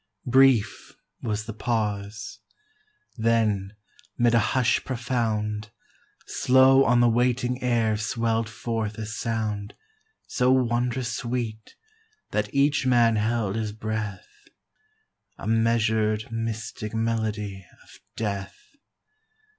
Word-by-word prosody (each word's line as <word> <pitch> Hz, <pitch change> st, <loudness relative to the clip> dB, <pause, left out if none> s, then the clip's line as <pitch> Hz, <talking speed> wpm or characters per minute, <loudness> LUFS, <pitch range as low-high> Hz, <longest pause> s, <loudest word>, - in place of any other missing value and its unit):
Brief 130 Hz, -3 st, +3 dB, 0.3 s
was 110 Hz, -1 st, -2 dB
the 115 Hz, -, -6 dB
pause; 105 Hz, -2 st, -3 dB, 0.8 s
then, 110 Hz, -4 st, +1 dB, 0.4 s
'mid 120 Hz, -1 st, +3 dB
a 115 Hz, -, +5 dB
hush 125 Hz, +3 st, +1 dB
profound, 110 Hz, -4 st, -2 dB, 0.6 s
Slow 130 Hz, +1 st, +5 dB
on 120 Hz, 0 st, +4 dB
the 120 Hz, -, +5 dB
waiting 125 Hz, +1 st, +1 dB
air 115 Hz, -3 st, +1 dB
swell'd 115 Hz, +1 st, -1 dB
forth 110 Hz, -2 st, -3 dB
a 110 Hz, -, -4 dB
sound 110 Hz, -2 st, -3 dB, 0.5 s
So 125 Hz, +1 st, +1 dB
wondrous 125 Hz, -1 st, +1 dB
sweet 115 Hz, -3 st, -4 dB, 0.6 s
that 105 Hz, -1 st, -1 dB
each 140 Hz, 0 st, +2 dB
man 120 Hz, -3 st, +4 dB
held 110 Hz, -2 st, 0 dB
his 110 Hz, -2 st, -2 dB
breath; 110 Hz, -3 st, -6 dB, 0.9 s
A -, -, -9 dB
measur'd, 110 Hz, -1 st, +1 dB
mystic 115 Hz, -1 st, -4 dB
melody 110 Hz, -3 st, -2 dB, 0.2 s
of -, -, -18 dB, 0.2 s
death. 100 Hz, -3 st, -4 dB
115 Hz, 100 wpm, -25 LUFS, 105-120 Hz, 0.9 s, a